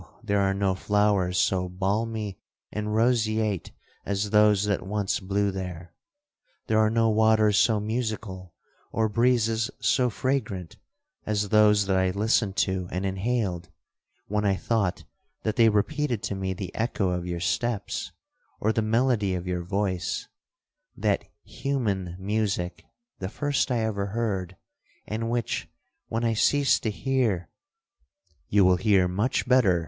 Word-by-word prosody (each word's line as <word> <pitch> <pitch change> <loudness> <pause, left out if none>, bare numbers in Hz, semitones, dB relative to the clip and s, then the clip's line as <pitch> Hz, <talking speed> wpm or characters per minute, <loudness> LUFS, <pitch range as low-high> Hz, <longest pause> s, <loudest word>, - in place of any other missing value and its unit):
there 100 -3 +1
are 95 0 +2
no 100 -1 +1
flowers 100 -2 +1
so 90 -2 +1
balmy 105 +2 -2 0.3
and 105 0 -3
roseate 110 -4 +1 0.3
as 100 +1 -2
those 105 -2 +5
that 100 -2 0
once 100 0 -1
blew 100 +1 0
there! 90 -2 -6 0.7
There 110 0 +2
are 110 0 +4
no 115 0 +2
waters 110 -1 +4
so 110 -1 +3
musical, 105 -5 -4 0.4
or 110 -1 +1
breezes 115 0 +2
so 125 -1 +2
fragrant, 110 -9 -2 0.5
as 105 -1 0
those 105 -1 +5
that 95 -1 +1
I 95 0 +2
listened 105 +1 +1
to 95 -2 -3
and 90 +2 -2
inhaled, 95 -3 -1 0.6
when 105 +1 -1
I 100 -1 +2
thought 100 -5 -1 0.4
that 110 -1 -1
they 115 -2 +6
repeated 120 +3 0
to - - -2
me 95 -1 -2
the 95 0 -6
echo 110 -5 0
of 90 0 -3
your 85 -1 -3
steps, 105 +3 -2 0.5
or 110 +1 +1
the 110 - +1
melody 110 -3 +1
of 90 0 -4
your 90 -1 -2
voice—that 100 - -3 0.2
human 105 -11 -2
music 95 -3 -2 0.4
the 95 - -4
first 145 +3 0
I 120 -3 +1
ever 100 -3 -1
heard, 95 -4 -2 0.5
and 115 +2 -3
which, 120 -1 -2 0.4
when 115 +1 -2
I 115 -1 +2
cease 140 +5 +3
to 110 - -2
hear'—'You 130 - -2
will 90 0 +5
hear 95 -2 +3
much 105 +9 -1
better!' 115 -9 +4
105 Hz, 140 wpm, -26 LUFS, 95-115 Hz, 0.7 s, they